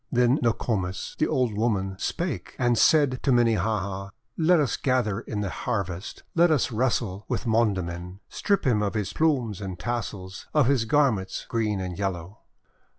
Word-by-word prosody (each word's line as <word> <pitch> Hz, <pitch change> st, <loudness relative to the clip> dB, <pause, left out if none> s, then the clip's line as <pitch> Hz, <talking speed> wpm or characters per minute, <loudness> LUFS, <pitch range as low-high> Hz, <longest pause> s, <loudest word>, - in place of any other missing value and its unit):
TJien 125 Hz, +3 st, +3 dB
Nokomis, 105 Hz, -5 st, -1 dB
the -, -, +3 dB
old 125 Hz, -4 st, +1 dB
woman, 100 Hz, -4 st, 0 dB
Spake, 175 Hz, -4 st, -3 dB
and 120 Hz, -1 st, +2 dB
said 135 Hz, +1 st, +4 dB
to 140 Hz, -, +1 dB
Minnehaha, 105 Hz, -4 st, +1 dB, 0.3 s
"Let 170 Hz, +1 st, +4 dB
us 140 Hz, -6 st, +1 dB
gather 125 Hz, -6 st, 0 dB
in 105 Hz, -2 st, -4 dB
the 100 Hz, -3 st, -2 dB
harvest, 95 Hz, -2 st, -4 dB
Let 170 Hz, +1 st, +5 dB
us 150 Hz, -5 st, +2 dB
wrestle 110 Hz, -4 st, -1 dB
with -, -, -2 dB
Mondamin, 95 Hz, -5 st, 0 dB
Strip 200 Hz, -1 st, 0 dB
him 115 Hz, -5 st, +3 dB
of 105 Hz, +1 st, -1 dB
his 105 Hz, -3 st, -2 dB
plumes 130 Hz, -, +1 dB
and 95 Hz, -2 st, -5 dB
tassels, 95 Hz, -2 st, -5 dB
Of 150 Hz, -3 st, +5 dB
his 130 Hz, -3 st, +2 dB
garments 110 Hz, -7 st, +1 dB
green 110 Hz, -4 st, -1 dB
and 90 Hz, 0 st, -5 dB
yellow 95 Hz, 0 st, -4 dB
110 Hz, 155 wpm, -26 LUFS, 95-125 Hz, 0.3 s, Let